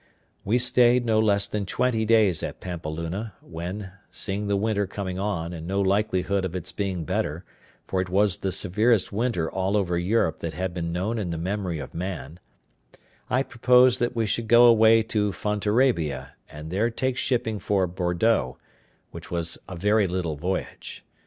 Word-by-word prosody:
We 110 +5 +2
stayed 125 0 +4
no 110 -2 +2
less 100 -2 +3
than 100 -1 -3
twenty 115 0 0
days 105 -7 +3
at - - -5
Pampeluna; 85 +4 -5
when 90 +4 -6 0.2
(seeing 100 +1 -3
the 100 - +1
winter 100 -1 0
coming 95 -1 -5
on, 90 -4 -2
and 80 -1 -7
no 100 +2 -1
likelihood 100 -1 +1
of 95 -1 -4
its 90 - -4
being 95 -4 -3
better, 75 +4 -2 0.4
for 95 - -1
it 90 - -4
was 100 +1 +2
the 95 - -2
severest 105 +3 +2
winter 110 -7 0
all 95 +2 0
over 90 -4 0
Europe 90 -2 +1
that 80 -1 -4
had 95 0 -3
been 85 -1 -3
known 100 +7 -2
in 95 -5 -3
the 85 - -3
memory 90 0 -2
of 70 - -8
man) 85 -3 -5 0.9
I 125 +2 +2
proposed 125 0 +4
that 120 0 -1
we 115 -1 +1
should 110 +2 -2
go 120 +2 +7
away 115 -1 +6
to 105 -2 0
Fontarabia, 105 - 0 0.2
and 75 +2 -9
there 105 +6 +1
take 130 +2 -1
shipping 115 -5 -1
for 100 -2 +1
Bordeaux, 90 - 0 0.5
which - - -9
was 85 -1 -2
a 95 - -6
very 105 +3 +2
little 90 -3 -2
voyage. 90 +6 -5
100 Hz, 170 wpm, -25 LUFS, 90-110 Hz, 0.9 s, go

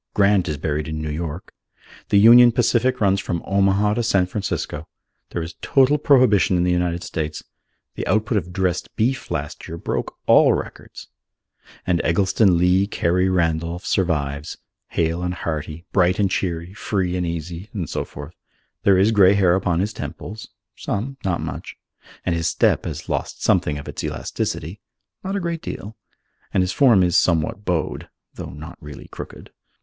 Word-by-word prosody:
Grant 100 -3 +3
is 75 - -2
buried 75 +1 -2
in 80 0 -4
New 80 -1 -3
York. 80 +2 -5 0.6
The 100 - +4
Union 120 +3 +8
Pacific 125 +2 +1
runs 100 -2 +3
from 85 -3 -3
Omaha 100 +1 +2
to 120 - 0
San 100 -5 +2
Francisco. 90 -5 -4 0.4
There 85 - -3
is 85 +1 -7
total 140 +2 +3
prohibition 125 -10 +4
in 85 - +2
the 90 - +2
United 90 0 0
States. 75 -2 -4 0.5
The - - -5
output 110 +2 +2
of 90 -1 -10
dressed 90 -2 -2
beef 125 +4 -1
last - - -4
year 85 - -6
broke - - -4
all - - +6
records. - - -7 0.8
And 90 -2 +1
Eggleston 95 +1 +3
Lee 90 +3 +3
Carey 90 -1 +1
Randolph 85 0 -1
survives, 75 -6 -1 0.3
hale 85 +1 -1
and 90 0 -2
hearty, 80 0 -5
bright 90 0 +3
and 100 -2 +1
cheery, 85 -1 -2
free 95 -4 -2
and 90 - -1
easy 85 +3 -5
and 90 -7 -4
so - - -3
forth. 75 +4 -10 0.5
There 100 -2 +4
is 100 +4 +4
grey 100 -2 +5
hair 95 -3 +4
upon 90 -2 +1
his 105 +2 -2
temples 110 +1 -7 0.3
(some, 130 +7 -4
not 90 -3 -1
much), - - -6 0.5
and 90 - +1
his 85 0 0
step - - +2
has - - -6
lost - - -3
something 75 - +2
of 70 - -8
its - - -6
elasticity 85 +7 -4 0.4
(not 195 +1 -3
a - - 0
great 170 -2 -3
deal), 105 +3 -7 0.6
and 95 - +2
his 90 - -1
form 115 -5 +5
is 90 -2 +1
somewhat 85 +4 +1
bowed 85 -3 -2 0.2
(though - - -7
not 75 +3 -10
really 75 -1 -10
crooked). - - -10
90 Hz, 170 wpm, -22 LUFS, 85-105 Hz, 0.8 s, Union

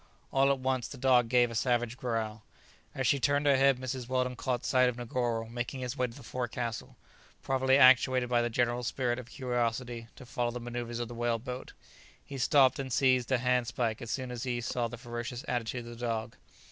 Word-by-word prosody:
All 135 +1 +4
at 140 - +1
once 130 -2 -1
the 140 - -9
dog 125 -2 +3
gave 120 -1 +4
a - - -6
savage 120 0 0
growl. 115 -4 -3 0.5
As - - -1
she 140 - +3
turned 145 +2 +2
her 140 -1 +5
head, 135 0 +4
Mrs 130 -1 -5
Weldon 125 -1 0
caught 125 0 -2
sight 130 -1 +4
of 125 - -5
Negoro 120 -2 -2
making 120 +3 -4
his 125 +1 -3
way 125 -2 0
to 115 - -12
the 140 - -12
forecastle, 120 -1 -4 0.5
probably 130 0 +3
actuated 130 -1 +6
by 120 -1 +2
the 120 - 0
general 120 +1 0
spirit 120 0 -1
of 125 - -9
curiosity 120 -2 -2
to 130 - -12
follow 120 0 -1
the 125 +1 -5
maneuvers 120 0 -5
of 120 -1 -3
the 120 - -8
whale 120 0 0
boat. 125 +2 -7 0.5
He 140 -1 -7
stopped 135 +1 +4
and 135 -1 -4
seized 130 -1 +2
a 130 - +4
handspike 125 -2 0
as 120 - -7
soon 130 +1 -3
as 120 -2 -5
he 125 -1 -2
saw 120 0 -1
the 120 +2 -8
ferocious 120 +1 -6
attitude 120 0 -2
of 120 0 -10
the - - -7
dog. 110 -1 -3
125 Hz, 210 wpm, -30 LUFS, 120-130 Hz, 0.5 s, actuated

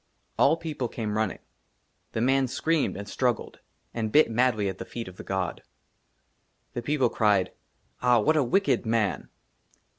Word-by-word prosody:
ALL 165 - +5
PEOPLE 155 -7 -4
CAME 110 -3 -4
RUNNING. 110 0 0 0.8
THE 110 - -1
MAN 135 +2 +3
SCREAMED 160 - 0
AND 100 0 -7
STRUGGLED, 120 +2 -1 0.3
AND 110 -2 -2
BIT 150 -4 +5
MADLY 115 -3 +2
AT 95 -1 -4
THE - - -5
FEET 115 -3 -6
OF 95 0 -11
THE - - -8
GOD. 95 -3 -3 1.1
THE 120 - -3
PEOPLE 135 -1 +1
CRIED, 100 -4 +2 0.3
'* - - -40
AH, 125 -2 +4
WHAT 155 +9 +3
A 150 - +3
WICKED 195 +10 +2
MAN 110 -3 0
120 Hz, 160 wpm, -27 LUFS, 105-135 Hz, 1.1 s, ALL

